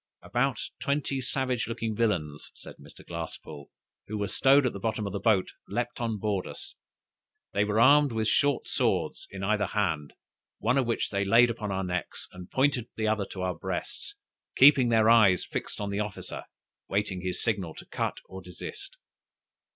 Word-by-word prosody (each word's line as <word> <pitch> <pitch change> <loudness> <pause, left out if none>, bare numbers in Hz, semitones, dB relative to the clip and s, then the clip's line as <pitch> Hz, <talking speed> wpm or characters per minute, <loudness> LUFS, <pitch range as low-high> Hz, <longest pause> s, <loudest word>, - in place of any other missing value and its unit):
"About 125 0 0 0.2
twenty 140 -1 -1
savage 125 -2 -1
looking 115 -1 -3
villains," 85 -10 -1
says - - -11
Mr. - - -15
Glasspoole, 80 -4 -7 0.4
"who 110 - -4
were 100 -1 -1
stowed 135 +5 +4
at 125 - 0
the 100 - -6
bottom 110 0 -2
of 100 - -4
the 100 - -2
boat, 100 -2 +2 0.2
leaped - - -3
on 115 -2 -1
board 100 -2 -1
us. - - -8 0.8
They 100 - +2
were 105 +1 0
armed 145 +3 +6
with 110 -1 -1
a - - -2
short 140 +5 +2
sword - - 0
in 95 0 -7
either 105 0 +1
hand, 80 -8 -1 0.4
one 125 +4 +2
of 130 - 0
which 115 - -1
they 100 0 0
layed 115 +4 +5
upon 110 -3 -4
our 95 0 -1
necks, 90 -1 -4
and 90 -1 -11
pointed 130 -3 +1
the 110 -1 -1
other 105 -2 0
to 95 - -6
our 90 -1 0
breasts, 80 - -5 0.4
keeping 135 -3 +7
their 110 -1 +4
eyes 110 -6 +5
fixed - - -5
on 100 -1 -3
their 100 +1 -1
officer, 105 -2 -7 0.4
waiting 100 -2 -1
his 90 0 -3
signal 95 -8 -1
to - - -10
cut - - -3
or 95 0 -9
desist. 390 - -9
105 Hz, 180 wpm, -28 LUFS, 95-120 Hz, 0.8 s, keeping